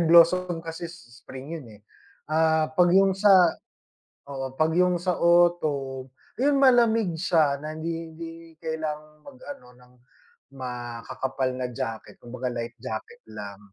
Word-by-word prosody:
blossom 170 +1 +4
kasi 165 +1 -6
s 125 -8 -15
spring 135 +4 -9
yun, 135 - -13
eh. - - -23 0.5
Ah, 160 0 +2
pag 175 +2 +4
yung 195 0 +5
sa 190 -3 +5 0.8
oo, 135 -1 -5
pag 160 +1 +2
yung 180 0 +3
sa 180 0 0
autumn 155 -7 +2 0.3
ayun 280 +2 +3
malamig 230 -8 +4
siya 155 -5 +2
na 155 0 -5
hindi 165 +1 -5
hindi 165 +1 -7 0.3
kailangang 155 -1 -5
mag 275 -2 -12 0.2
ano 275 - -19
ng 125 0 -21 0.6
makakapal 130 +1 -4
na 130 - -2
jacket 115 -2 -6
kumbaga 125 +1 -6
light 120 -1 -5
jacket 110 -4 -6
lang. 100 -2 -8
160 Hz, 140 wpm, -26 LUFS, 130-175 Hz, 0.8 s, yung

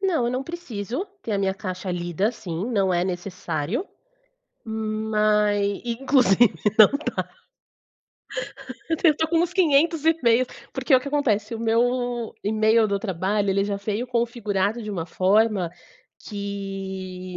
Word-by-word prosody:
Não, 340 -11 +1
eu - - 0
não 255 +1 -1
preciso 265 - -5 0.2
ter 220 - -3
a 200 - +1
minha 190 -1 0
caixa 185 -2 -5
lida, 175 +3 -1
assim, 190 -7 -5
não 195 -5 +2
é 175 0 +1
necessário, 180 - -3 0.8
mas 215 -1 +1 0.2
e 240 -1 -1
inclusive 245 -5 +4 0.2
não 215 -2 +10 0.3
dá. - - -2 1.6
Eu 325 - +1
tenho 315 -2 +4
tô 320 0 0
com 335 0 +2
uns 345 +1 +1
500 325 -2 +3
e-mails, 255 -7 +3 0.2
porque, 280 - +2
o 255 - +6
que 270 - -6
acontece: 245 -6 0
o 225 - -5
meu 240 +1 0
e-mail 220 +1 +3
do 200 0 0
trabalho 195 +1 -1
ele 195 +1 +2
já 200 0 -2
veio 210 +4 -3
configurado 230 -3 -1
de 215 - -5
uma 170 -5 -3
forma 195 0 +2 0.5
que 195 -2 -6
215 Hz, 145 wpm, -24 LUFS, 195-245 Hz, 1.6 s, não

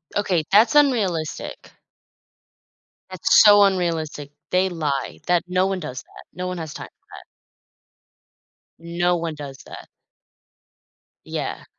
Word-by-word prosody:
Okay. 180 -6 0
That's 220 +8 +5
unrealistic. 205 - 0 1.4
That's 185 +3 +4
so 205 -1 +7
unrealistic. 165 -6 -1 0.2
They 185 +1 +2
lie 150 -6 -3
that 175 -1 +2
no 185 +1 +1
one 190 -1 -2
does 135 -5 -6
that. - - -16
No 180 0 -5
one 180 -1 -4
has 160 -2 -6
time - - -8
for - - -32
that. - - -12 1.6
No 175 +1 0
one 165 -2 -4
does 140 -2 -9
that. - - -11 1.4
Yeah. - - -5
175 Hz, 120 wpm, -22 LUFS, 155-190 Hz, 1.6 s, so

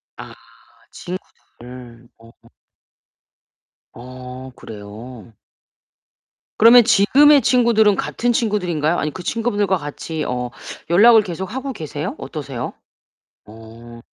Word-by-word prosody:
아 - - -11 0.6
친구들. 125 -9 -11
어. 115 0 -18 1.6
어 130 +1 -10
그래요? 110 +3 -11 1.2
그러면 235 +2 +7
지금의 270 +7 +5
친구들은 230 -4 +3
같은 240 +5 -2
친구들인가요 180 -9 -1
아니면 150 0 -3
그 185 - -8
친구분들과 205 -3 -1
같이 155 +1 -6
어 125 0 -3 0.4
연락을 220 +6 +6
계속 190 +3 -6
하고 265 +1 -4
계세요? 155 - -6
어떠세요? 135 -6 -6 0.7
어. 115 +2 -14
160 Hz, 230 characters per minute, -19 LUFS, -, 1.6 s, 그러면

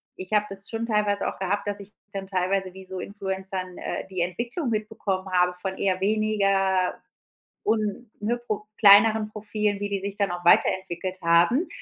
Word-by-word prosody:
ich 185 +1 -9
habe 210 -1 +3
das 195 0 -5
schon 230 0 -3
teilweise 210 -2 +1
auch - - -4
gehabt, 195 +2 -1
dass 205 0 -2
ich 200 +1 -13 0.2
dann 195 -1 -4
teilweise 190 0 -1
wie 190 0 -11
so 185 0 -6
Influencern, 190 -2 -5
äh, - - -4
die 185 -2 -3
Entwicklung 235 - -2
mitbekommen 205 -3 -2
habe, 180 0 +3
von 190 -1 -3
eher 185 -2 +1
weniger 195 -3 +2
f - - -25 0.6
un, 215 +1 0
ne, 235 +3 0
Pro 215 -3 -4
kleineren 215 +1 +7
Profilen, 210 -1 -1
wie 205 - -2
die 200 -1 -1
sich 200 +1 -5
dann 200 -2 0
auch 175 0 -6
weiterentwickelt 185 +1 +2
haben, 170 - +4
195 Hz, 180 wpm, -25 LUFS, 190-210 Hz, 0.6 s, kleineren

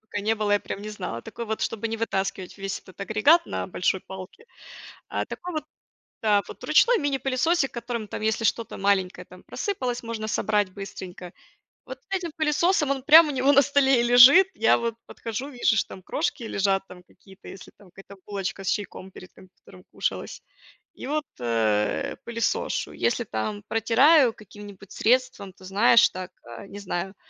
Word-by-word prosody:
пока 210 -2 -6
не 220 +2 +1
было, 210 -1 -1
я 205 - +3
прям 200 - -6
не 210 - -7
знала. 180 - -5
Такой 235 - -7
вот, 220 0 -4
чтобы 225 0 -2
не 225 0 -4
вытаскивать 195 -4 -3
весь 195 0 -4
этот 185 - -18
агрегат 220 +12 +3
на - - -4
большой 185 +1 -1
палке. 190 - -11 0.6
А - - -3
такой 360 - -7
вот 310 -2 -3 0.6
да. 210 -2 +3
Вот - - -11
ручной - - +4
мини-пылесосик, 275 0 0
которым 235 -2 -5
там - - -6
если 220 +1 0
что-то 230 0 -1
маленькое 195 -2 0
там - - -15
просыпалось, 255 - -3
можно 225 -2 -5
собрать 210 -3 0
быстренько. 185 -2 -9 0.5
Вот - - -8
с - - -1
этим 355 -3 -4
пылесосом, 310 0 +1
он 270 -1 -1
прям 315 +2 +8
у - - -2
него 270 0 +2
на 280 0 +6
столе 270 -2 +3
и - - +2
лежит. 250 +10 +8
Я 225 - +3
вот 230 -1 -3
подхожу, 230 +4 -6
вижу, 245 -4 +1
что - - 0
там 190 - -10
крошки 290 - -3
лежат 195 -3 0
там 180 -1 -13
какие-то, 190 +2 -17
если 190 - -11
там 195 -3 -18
какая-то 195 +2 -14
булочка 195 -1 -4
с - - -7
чайком 190 -2 -4
перед 185 -1 -13
компьютером 185 0 -18
кушалась. - - -4 0.5
И - - -9
вот, 300 +2 -1 0.2
э, 110 -3 0
пылесошу. 235 - -2
Если 240 0 -1
там 110 - -4
протираю 240 +4 +4
каким-нибудь 205 -1 -13
средством, 225 -5 0
ты 185 - -19
знаешь, 210 +5 +5
так, 185 0 -8
э, 115 -1 -10
не 205 - -10
знаю, 190 0 -4
220 Hz, 180 wpm, -25 LUFS, 195-260 Hz, 0.6 s, прям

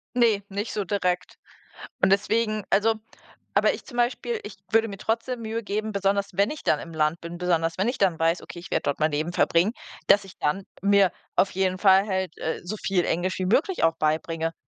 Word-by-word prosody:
Ne, 230 -4 +3
nicht 205 +3 -4
so 210 - -1
direkt. 180 -2 -1 0.7
Und - - +4
deswegen 215 +2 +1
also 220 +3 +3 0.6
aber - - +4
ich - - -8
zum 245 - -10
Beispiel, 240 -1 0
ich 205 - -8 0.2
würde 225 0 +4
mir 200 - -6
trotzdem 230 +4 -2
Mühe 225 +1 -3
geben, 215 +1 -2
besonders 200 0 0
wenn 200 +7 +2
ich 305 - -7
dann 150 - +2
im 165 - -9
Land 155 +1 +1
bin. 170 +1 -7
Besonders 165 -2 0
wenn 195 +5 +1
ich 250 - -3
dann 185 -5 +2
weiß: 165 +2 +2
„Okay, 175 - -10
werde - - 0
dort 145 - -1
mein 155 0 +2
Leben 155 +4 -2
verbringen.“ 180 +6 +3 0.3
Dass 200 0 +6
ich 195 +1 -14
dann 170 +7 0 0.2
mir 200 -1 +4 0.2
auf 195 - +3
jeden 185 0 0
Fall 195 0 +5
halt, 190 -4 -2
äh, 160 - -3
so 200 +5 -5
viel 195 -3 0
Englisch 180 +3 -1
wie 185 - 0
möglich 315 - +1
auch 165 0 +3
beibringe. 160 +1 -1
195 Hz, 210 wpm, -25 LUFS, 170-215 Hz, 0.7 s, Dass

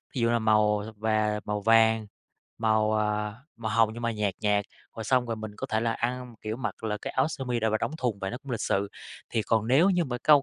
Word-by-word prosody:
Thí 125 - 0
dụ 115 - +3
như 120 - +2
là 120 - +3
màu 105 -1 +3
th 110 -1 -10
và 110 -1 +1
màu 105 0 -2
vàng, 110 0 +4 0.5
màu, 110 -1 +2
ờ, 105 -1 0 0.2
màu 110 -3 -3
hồng 115 +1 +4
nhưng 120 - -7
mà 115 - +1
nhạt 105 -3 -1
nhạt, 105 -1 +2 0.3
rồi 110 - -4
xong 125 +2 +2
rồi 115 -1 -2
mình 110 0 -6
có 135 - -4
thể 110 -4 0
là 115 0 +1
ăn, 125 +1 -3
kiểu, 110 +1 -3
mặc 125 -2 -5
là 105 -1 -1 0.2
áo 135 +4 +2
sơ 140 -4 -5
mi 120 -2 -1
đ - - -2
và 110 - +1
đóng - - -1
thùng 120 -7 -1
và 95 0 -3
nó 120 - -5
cũng 140 - -9
lịch 115 - -2
sự. 100 +1 0 0.4
Thì 110 - 0
còn 110 +1 +1
nếu 155 +10 +5
như 180 -2 +2
mà 125 -4 -3
câu 145 -2 +6
110 Hz, 265 wpm, -28 LUFS, 105-120 Hz, 0.5 s, câu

